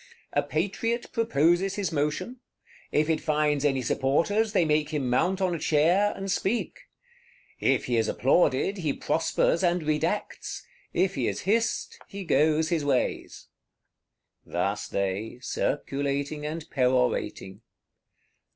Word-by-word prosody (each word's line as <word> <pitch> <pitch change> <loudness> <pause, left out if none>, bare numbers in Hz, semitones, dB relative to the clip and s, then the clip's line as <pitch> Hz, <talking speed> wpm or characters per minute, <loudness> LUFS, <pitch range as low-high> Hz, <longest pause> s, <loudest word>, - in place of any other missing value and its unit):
"A - - +3
Patriot 200 - -2
proposes 190 - +2
his 200 -5 -2
motion; 150 - -2 0.5
if 150 0 +2
it 160 -1 +1
finds 150 -2 +1
any 135 -3 +1
supporters, 170 - +1
they 175 - +3
make 150 -1 +1
him 140 -5 -2
mount 185 +9 +1
on 185 -2 +1
a 170 - -3
chair, 170 +8 +3
and 195 0 -4
speak. 215 +5 -2 0.7
If - - +2
he 120 -2 0
is 110 -1 +2
applauded, 135 - +2
he 155 -5 0
prospers 165 +2 +1
and 175 -1 +2
redacts; 155 +6 -2 0.3
if 190 0 +1
he - - -1
is - - -2
hissed, 225 +4 0
he 200 0 -7
goes 155 0 +2
his 165 -4 0
ways." 140 -3 -1 0.9
Thus 100 +4 -2
they, 100 +4 -2
circulating 140 +3 -2
and 160 +1 -5
perorating. 125 -6 0
155 Hz, 130 wpm, -27 LUFS, 140-185 Hz, 0.9 s, A